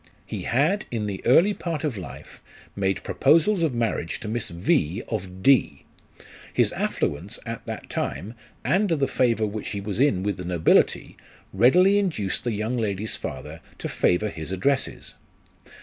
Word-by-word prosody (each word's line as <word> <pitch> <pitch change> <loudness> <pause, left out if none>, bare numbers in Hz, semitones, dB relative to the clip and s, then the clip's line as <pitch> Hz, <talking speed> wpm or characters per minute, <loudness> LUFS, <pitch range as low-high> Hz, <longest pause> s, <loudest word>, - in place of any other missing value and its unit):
1 - - -27
He - - -5
had 160 - +1
in 110 -3 -2
the 100 -2 -5
early 170 +12 +6
part 165 -5 -4
of 150 -6 -1
life 90 -9 -10 0.3
made 95 -2 -1
proposals 170 +4 +3
of 155 -7 +1
marriage 115 -7 -1
to - - -7
Miss 115 +1 -2
V, 90 - 0
of 95 -3 -5
D: 125 - +3 0.7
his - - +2
affluence 90 +11 -2
at 115 -1 -5
that - - -6
time, 105 +5 -3 0.3
and 200 +2 +2
the 145 -5 +1
favour 115 -3 +1
which 105 0 -4
he 100 - -3
was 100 +2 -4
in 120 -10 +3
with 100 -2 -1
the 90 - -6
nobility, 85 -2 +2 0.4
readily 180 - +5
induced 150 - -1
the 120 - -1
young 110 +4 -2
lady's 105 -2 -2
father 75 +5 -7 0.2
to - - -4
favour 105 +5 +1
his 80 -2 -7
addresses. 135 +9 -1
110 Hz, 165 wpm, -25 LUFS, 95-140 Hz, 0.7 s, early